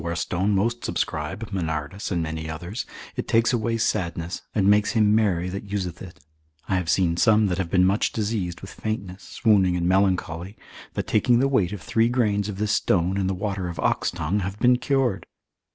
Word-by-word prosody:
To -, -, -9 dB
bezoar 85 Hz, 0 st, -2 dB
stone 95 Hz, +5 st, 0 dB
most 115 Hz, +5 st, 0 dB
subscribe, 75 Hz, +9 st, -3 dB
Manardus, 80 Hz, 0 st, -3 dB
and 85 Hz, -3 st, 0 dB
many 80 Hz, 0 st, -4 dB
others; 85 Hz, +8 st, -5 dB, 0.3 s
it -, -, -4 dB
takes 115 Hz, +2 st, +3 dB
away 115 Hz, -1 st, 0 dB
sadness, 85 Hz, -6 st, -2 dB
and 100 Hz, -3 st, +2 dB
makes 105 Hz, +3 st, +4 dB
him 105 Hz, -3 st, +4 dB
merry 95 Hz, -6 st, +2 dB
that 100 Hz, +2 st, -7 dB
useth 90 Hz, -4 st, -3 dB
it; 90 Hz, -3 st, -10 dB, 0.5 s
I 95 Hz, -, +1 dB
have 90 Hz, -2 st, -2 dB
seen 85 Hz, -3 st, +2 dB
some 110 Hz, +2 st, +4 dB
that 90 Hz, -, -1 dB
have 90 Hz, -3 st, -2 dB
been 90 Hz, 0 st, +4 dB
much 100 Hz, +3 st, +2 dB
diseased 105 Hz, -5 st, -2 dB
with 95 Hz, -, -9 dB
faintness, 100 Hz, -3 st, -4 dB
swooning, 95 Hz, -5 st, +2 dB
and 85 Hz, 0 st, 0 dB
melancholy, 95 Hz, 0 st, 0 dB, 0.4 s
that -, -, -2 dB
taking 120 Hz, +3 st, +3 dB
the 135 Hz, +3 st, +3 dB
weight 105 Hz, -10 st, +1 dB
of 105 Hz, -3 st, -7 dB
three 115 Hz, +1 st, +2 dB
grains 105 Hz, -5 st, +1 dB
of 100 Hz, -, -5 dB
this 105 Hz, 0 st, 0 dB
stone, 90 Hz, -2 st, +1 dB
in 95 Hz, -, 0 dB
the 95 Hz, -, -1 dB
water 100 Hz, -1 st, -3 dB
of 85 Hz, -, -7 dB
oxtongue, 85 Hz, +4 st, 0 dB
have 95 Hz, +1 st, -4 dB
been 125 Hz, +2 st, +4 dB
cured. 130 Hz, -8 st, 0 dB
95 Hz, 200 wpm, -24 LUFS, 90-110 Hz, 0.5 s, makes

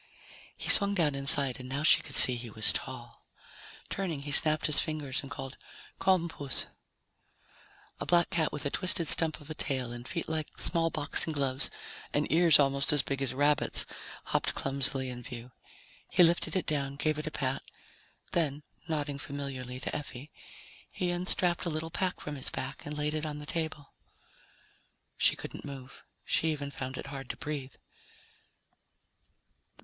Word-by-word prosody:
He -, -, -6 dB
swung 200 Hz, 0 st, +6 dB
down 160 Hz, -6 st, +1 dB
inside 140 Hz, -1 st, +2 dB
and 125 Hz, 0 st, -9 dB
now 140 Hz, +3 st, -3 dB
she -, -, +6 dB
could -, -, -5 dB
see 125 Hz, -, +12 dB
he 120 Hz, -1 st, -8 dB
was 110 Hz, 0 st, +5 dB
tall. -, -, -6 dB, 0.6 s
Turning, 165 Hz, -8 st, -4 dB
he 145 Hz, -, -6 dB
snapped 155 Hz, +2 st, +5 dB
his 150 Hz, -, +4 dB
fingers 150 Hz, -4 st, -2 dB
and 140 Hz, -, -11 dB
called, 135 Hz, -2 st, -8 dB, 0.4 s
"Come, 185 Hz, -2 st, +2 dB
puss." 145 Hz, -5 st, -1 dB, 1.3 s
A -, -, -6 dB
black 175 Hz, -1 st, +2 dB
cat 160 Hz, -2 st, 0 dB
with 150 Hz, 0 st, -7 dB
a 140 Hz, -, -2 dB
twisted 185 Hz, -3 st, +4 dB
stump 160 Hz, 0 st, +3 dB
of 150 Hz, +1 st, -11 dB
a -, -, -3 dB
tail 130 Hz, -5 st, -4 dB
and 120 Hz, +1 st, -9 dB
feet 170 Hz, -, -5 dB
like 160 Hz, -1 st, -5 dB
small 165 Hz, -1 st, +2 dB
boxing 155 Hz, +1 st, -3 dB
gloves 135 Hz, -2 st, +1 dB, 0.5 s
and 145 Hz, +1 st, +1 dB
ears 165 Hz, 0 st, +7 dB
almost 140 Hz, -1 st, +3 dB
as 145 Hz, -2 st, +4 dB
big 140 Hz, 0 st, -4 dB
as 135 Hz, -1 st, -2 dB
rabbits' 145 Hz, +2 st, +3 dB, 0.4 s
hopped -, -, -2 dB
clumsily 135 Hz, -1 st, +1 dB
in 125 Hz, -1 st, -7 dB
view. 125 Hz, -1 st, -10 dB, 0.6 s
He 180 Hz, -, +4 dB
lifted 170 Hz, +3 st, +1 dB
it 185 Hz, -, -1 dB
down, 140 Hz, -2 st, -2 dB
gave 155 Hz, +1 st, -1 dB
it 155 Hz, -, -6 dB
a -, -, -1 dB
pat. 135 Hz, -3 st, -3 dB, 0.7 s
Then, 150 Hz, -3 st, -1 dB, 0.2 s
nodding 145 Hz, -3 st, -3 dB
familiarly 135 Hz, -3 st, -7 dB
to -, -, -4 dB
Effie, 145 Hz, 0 st, -8 dB, 0.6 s
he 180 Hz, -1 st, -2 dB
unstrapped 175 Hz, 0 st, -1 dB
a -, -, -1 dB
little 160 Hz, +1 st, -5 dB
pack 185 Hz, +1 st, -2 dB
from 150 Hz, -1 st, -7 dB
his 135 Hz, -, -4 dB
back 135 Hz, +2 st, -7 dB
and 150 Hz, 0 st, -6 dB
laid 150 Hz, 0 st, -2 dB
it 155 Hz, -1 st, -3 dB
on 150 Hz, -1 st, -6 dB
the 150 Hz, -, -9 dB
table. 155 Hz, -2 st, -5 dB, 1.2 s
She -, -, +2 dB
couldn't -, -, -9 dB
move. 135 Hz, -2 st, -11 dB, 0.2 s
She 160 Hz, -, +1 dB
even 145 Hz, -2 st, -5 dB
found 130 Hz, -1 st, -7 dB
it -, -, -7 dB
hard 135 Hz, -2 st, -9 dB
to -, -, -6 dB
breathe. 140 Hz, -3 st, -6 dB
145 Hz, 170 wpm, -29 LUFS, 135-160 Hz, 1.3 s, see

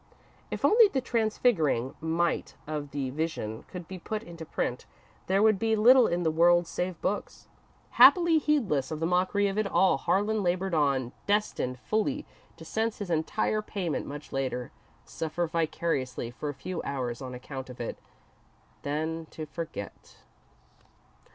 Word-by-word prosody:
If -, -, -2 dB
only 450 Hz, 0 st, +7 dB
the 275 Hz, -, -1 dB
transfiguring 215 Hz, -, +1 dB
might 165 Hz, +2 st, 0 dB
of 150 Hz, -1 st, -4 dB
the 135 Hz, -2 st, -3 dB
Vision 135 Hz, -8 st, -3 dB
could 180 Hz, -3 st, -8 dB
be 190 Hz, -1 st, -7 dB
put 215 Hz, +5 st, -4 dB
into 170 Hz, -4 st, -9 dB
print, 125 Hz, -, -3 dB, 0.4 s
there 195 Hz, +2 st, +3 dB
would 215 Hz, -3 st, +4 dB
be 225 Hz, 0 st, +2 dB
little 245 Hz, +3 st, +7 dB
in 175 Hz, +1 st, 0 dB
the 160 Hz, -, +2 dB
world 175 Hz, +2 st, +4 dB
save 180 Hz, 0 st, -3 dB
books. 205 Hz, -, -3 dB, 0.4 s
Happily 340 Hz, -3 st, +7 dB
heedless 215 Hz, -, +1 dB
of 155 Hz, -, -4 dB
the 165 Hz, -, 0 dB
mockery 185 Hz, +4 st, +2 dB
of 195 Hz, +1 st, -1 dB
it 215 Hz, -, +1 dB
all, 190 Hz, -5 st, +3 dB
Harlan 205 Hz, +8 st, +1 dB
laboured 185 Hz, 0 st, 0 dB
on, 140 Hz, -5 st, +1 dB, 0.2 s
destined 205 Hz, -11 st, 0 dB
fully 220 Hz, -, -1 dB, 0.3 s
to -, -, -11 dB
sense 225 Hz, 0 st, -1 dB
his 200 Hz, -4 st, -5 dB
entire 190 Hz, +6 st, 0 dB
payment 185 Hz, -7 st, -3 dB
much 145 Hz, +1 st, -8 dB
later, 130 Hz, -2 st, -2 dB, 0.3 s
suffer 165 Hz, +2 st, -2 dB
vicariously 155 Hz, -7 st, -2 dB
for 150 Hz, +5 st, -5 dB
a -, -, -3 dB
few 175 Hz, +6 st, -5 dB
hours 125 Hz, -3 st, -3 dB
on 130 Hz, -1 st, -6 dB
account 130 Hz, +1 st, -7 dB
of 125 Hz, -, -10 dB
it, 120 Hz, -, -4 dB, 0.8 s
then 160 Hz, +3 st, -3 dB
to 155 Hz, -, -7 dB
forget. 150 Hz, -, -7 dB
170 Hz, 155 wpm, -28 LUFS, 145-205 Hz, 0.8 s, only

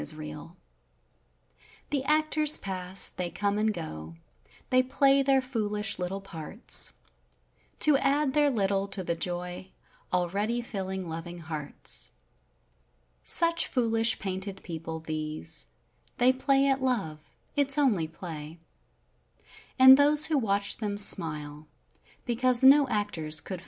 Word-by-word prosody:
I -, -, -5 dB
I 150 Hz, 0 st, -4 dB, 1.4 s
The 280 Hz, -2 st, -1 dB
actors 305 Hz, 0 st, +4 dB
pass, 185 Hz, 0 st, -2 dB
they 180 Hz, -1 st, -5 dB
come 205 Hz, +3 st, -2 dB
and 215 Hz, 0 st, 0 dB
go, 80 Hz, -, -8 dB, 0.6 s
they 255 Hz, 0 st, +4 dB
play 275 Hz, +1 st, +2 dB
their 270 Hz, -1 st, +1 dB
foolish 215 Hz, -5 st, -2 dB
little 185 Hz, +2 st, -5 dB
parts. 195 Hz, +3 st, +5 dB, 0.9 s
To 300 Hz, -2 st, +4 dB
add 280 Hz, 0 st, 0 dB
their 295 Hz, 0 st, +2 dB
little 200 Hz, -5 st, -1 dB
to 195 Hz, -1 st, -4 dB
the 170 Hz, -, -2 dB
joy 180 Hz, +2 st, -4 dB, 0.4 s
already 200 Hz, +6 st, -2 dB
fill¬ 195 Hz, -5 st, -6 dB
ing 190 Hz, -2 st, -6 dB
loving 165 Hz, +2 st, -8 dB
hearts; 155 Hz, -3 st, -4 dB, 1.1 s
Such 335 Hz, 0 st, +2 dB
foolish, 230 Hz, -2 st, +2 dB
painted 190 Hz, 0 st, -6 dB
people 160 Hz, -1 st, -7 dB
play 155 Hz, -1 st, -5 dB, 1.3 s
at 270 Hz, -1 st, 0 dB
love—it's 250 Hz, -, -3 dB
And 165 Hz, -, -3 dB, 1.4 s
those 295 Hz, +1 st, +5 dB
who 315 Hz, -2 st, +1 dB
watch 200 Hz, -3 st, -2 dB
cause 200 Hz, -, -1 dB
no 275 Hz, +1 st, +6 dB
actors 170 Hz, -8 st, -2 dB
c 190 Hz, -, -5 dB
they. -, -, -10 dB
200 Hz, 110 wpm, -27 LUFS, 165-260 Hz, 1.4 s, no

